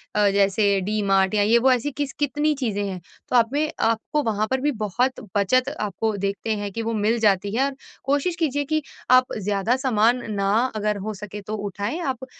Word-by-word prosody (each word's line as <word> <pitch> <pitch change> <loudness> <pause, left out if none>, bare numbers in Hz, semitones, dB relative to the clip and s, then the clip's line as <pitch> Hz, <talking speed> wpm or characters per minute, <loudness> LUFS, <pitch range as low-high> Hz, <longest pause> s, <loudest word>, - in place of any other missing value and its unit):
अ, 210 -1 +4
जैसे 200 0 +2
D 210 +3 -1
mart 195 -1 +2
या 205 - +3
ये 225 +3 +4
वो, 260 +2 +4
ऐसी 255 +3 +1
किस 280 0 -3
कितनी 295 +1 +1
चीज़ें 220 -7 -2
हैं। 190 -2 -4 0.3
तो - - 0
आप 230 -1 +5
में 305 +2 0 0.2
आपको 230 +7 0
वहाँ 215 -1 0
पर 260 0 +1
भी 295 - +1
बहुत 245 +6 0 0.2
बचत 255 +6 +2
आपको 215 +1 -1
देखते 200 +3 -2
हैं 205 -1 -4
कि 230 - -4
वो 225 0 -2
मिल 215 +2 +1
जाती 200 -2 +2
है 260 - +2
और 275 -1 -3 0.3
कोशिश 285 +6 0
कीजिए 290 -3 0
कि 310 +2 0 0.3
आप 255 0 +5
ज़्यादा 205 +3 0
सामान 245 -1 +2 0.2
न - - 0 0.3
अगर 210 -1 -1
हो 215 - -2
सके 205 +1 -8
तो 210 +2 -5
उठाएँ, 205 - -4
आप 260 -5 -3
220 Hz, 210 wpm, -23 LUFS, 205-260 Hz, 0.3 s, आप